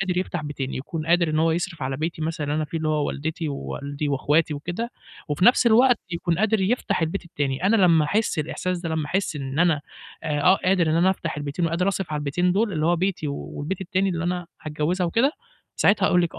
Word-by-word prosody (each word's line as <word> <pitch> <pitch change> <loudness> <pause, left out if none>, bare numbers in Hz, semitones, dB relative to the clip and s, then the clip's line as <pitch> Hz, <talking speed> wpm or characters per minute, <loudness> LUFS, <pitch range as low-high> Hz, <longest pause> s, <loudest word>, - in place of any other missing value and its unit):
قادر 185 -2 -1
يفتح 175 -3 -2
بيتين، 140 -3 -4
يكون 155 +4 -5
قادر 170 -1 +3
إن 155 - 0
هو 165 +1 +3
يصرف 170 -1 -2
على 135 0 -2
بيتي 160 +1 -3
مثلًا 160 -1 -2
اللي 145 +1 -1
أنا 155 - 0
فيه 165 +2 -4
اللي 155 0 -1
هو 150 -1 +1
والدتي، 160 +2 -3
ووالدي، 140 +1 -4
وأخواتي، 150 +3 +1
وكده، 175 +11 -4 0.4
وفي 150 +5 0
نَفْس 245 0 +6
الوقت 245 +2 +5
يكون 170 0 -1
قادر 220 -1 +2
يفتح 195 -3 0
البيت 170 +4 -2
التاني. 145 -2 -3
أنا 225 - +4
لمّا 170 -6 +5
أحس 205 +2 0
الإحساس 180 +4 -2
ده، 170 -1 -4
لمّا 160 -2 -1
أحس 185 -2 -1
إن 135 0 -4
أنا 165 -4 +3 0.4
أق 155 +5 +3
قادر 185 -3 +3
إن 155 - +2
أنا 180 +3 +4
أفتح 165 -4 -3
البيتين 145 +3 -2
وقادر 175 +4 0
أصرِف 190 -5 -2
على 150 - -1
البيتين 175 +5 0
دول 210 +2 +1
اللي 155 -2 0
هو 175 +1 +3
بيتي، 180 -3 -1
والبيت 145 +5 -5
التاني 190 +1 0
اللي 165 -1 -2
أنا 180 0 -2 0.2
هاتجوّزها 155 +4 -1
وكده، 235 - +2 0.4
ساعتها 200 -1 +3
هاقول 180 - +4
لِك 170 - -2
آه، - - -8
165 Hz, 225 wpm, -24 LUFS, 150-185 Hz, 0.4 s, نَفْس